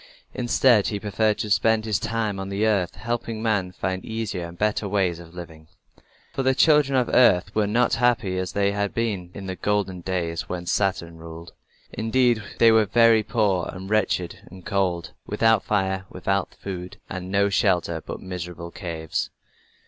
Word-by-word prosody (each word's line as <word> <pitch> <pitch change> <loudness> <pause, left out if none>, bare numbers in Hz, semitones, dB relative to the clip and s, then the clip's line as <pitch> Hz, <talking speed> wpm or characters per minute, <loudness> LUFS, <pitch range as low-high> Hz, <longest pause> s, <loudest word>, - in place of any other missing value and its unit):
Instead 120 -3 +3
he 105 - -2
preferred 105 +1 0
to 105 - -4
spend 110 +1 +3
his 110 -3 0
time 110 -3 -2
on 95 0 -5
the 100 +2 0
earth, 100 -5 +1
helping 115 -1 -3
men 100 -5 0
to - - -27
find 95 0 -2
easier 110 -6 -4
and 85 +1 -12
better 105 0 0
ways 95 -4 0
of 85 0 -13
living. 80 -3 -10 0.7
For - - -1
the 130 0 +2
children 150 -3 +4
of 125 - +2
earth 100 -8 +4
were 105 -1 +1
not 120 +4 +2
happy 115 -6 +1
as 95 - -4
they 100 0 +2
had 100 0 -2
been 105 -7 -2
in 100 - -7
the 95 -1 -4
golden 100 -2 -1
days 85 -2 -3
when 90 -1 -4
Saturn 85 -3 -1
ruled. 80 +1 -10 0.4
Indeed, 120 0 +2 0.2
they 115 -1 +6
were 110 -1 +5
very 115 +1 +5
poor 105 -5 0
and 95 +2 -8
wretched 95 -5 0
and 95 -1 -13
cold, 90 -4 -1 0.2
without 115 -2 +3
fire, 95 -2 0
without 95 +1 -2
food, 90 -2 -7
and 95 -1 -6
with 95 - -8
no 100 0 +3
shelter 90 -5 +1
but - - -6
miserable 90 -2 -6
caves. 80 -3 -4
100 Hz, 180 wpm, -24 LUFS, 90-110 Hz, 0.7 s, they